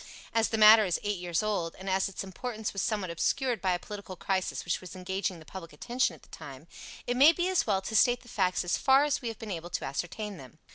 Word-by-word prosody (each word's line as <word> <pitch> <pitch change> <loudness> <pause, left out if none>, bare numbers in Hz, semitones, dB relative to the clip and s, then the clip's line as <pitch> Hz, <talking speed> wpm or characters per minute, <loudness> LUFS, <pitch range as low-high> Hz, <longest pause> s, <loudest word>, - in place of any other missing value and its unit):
As 225 -1 +2
the 225 - -1
matter 215 +1 +8
is 180 -4 0
eight 205 -2 -2
years 175 +1 -1
old, 195 -6 -2
and 190 - -10
as 190 0 +1
its 195 - -6
importance 215 +3 -5
was 195 - -2
somewhat 205 -6 -1
obscured 245 +8 0
by 185 -2 +1
a - - 0
political 200 0 -8
crisis 190 0 -2
which 175 - -1
was 185 0 -10
engaging 190 0 -3
the 160 - -14
public 165 -3 -9
attention 240 - -1
at - - -21
the - - -20
time, 135 +1 -10 0.4
it 245 - -1
may 280 +5 +8
be 350 +2 -1
as 375 -8 +1
well 195 -2 +1
to 220 - -4
state 245 +3 +4
the 245 - -18
facts 185 -6 0
as 175 - 0
far 270 +1 +5
as 295 -1 0
we 245 - -4
have 225 - -5
been 225 -4 -7
able 170 -1 -5
to - - -3
ascertain 185 +9 -4
them. 135 +1 -13
195 Hz, 255 wpm, -29 LUFS, 180-225 Hz, 0.4 s, matter